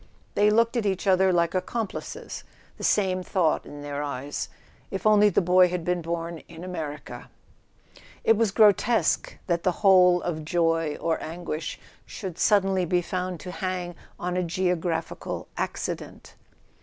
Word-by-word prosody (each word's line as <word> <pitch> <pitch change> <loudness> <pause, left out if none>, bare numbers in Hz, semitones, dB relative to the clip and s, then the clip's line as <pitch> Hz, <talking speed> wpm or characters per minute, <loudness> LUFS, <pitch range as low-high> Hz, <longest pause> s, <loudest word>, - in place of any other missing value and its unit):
They 210 +1 +4
looked 230 +3 +3
at 235 -3 0
each 190 0 -1
other 190 -1 +4
like 170 -1 +2
ac¬ 185 - 0
complices, 225 -4 -5 0.4
the - - -9
same 185 -3 +2
thought 180 -4 0
in 145 0 -9
their 145 0 -4
eyes: 140 0 -4 0.4
if 195 - -5
only 210 -1 +6
the 195 - +2
boy 180 +1 +5
had 175 -2 -3
been 180 -1 0
born 170 0 -4
in 165 0 -11
America! 155 -5 -6 0.9
It 225 - +5
was 225 0 +2
grotesque 215 +3 +3
that 170 -2 0
the 180 +1 +1
whole 180 -2 +7
of 155 -3 -3
joy 165 -2 +1
or 165 -1 -1
anguish 160 -1 -5 0.3
should 185 -4 -7
suddenly 195 -3 +3
be 175 0 +1
found 180 -1 -3
to 180 - -7
hang 180 -1 -3 0.3
on 180 0 -2
a 180 - +1
geographical 175 -1 -2
accident. - - -5
180 Hz, 155 wpm, -26 LUFS, 165-190 Hz, 0.9 s, whole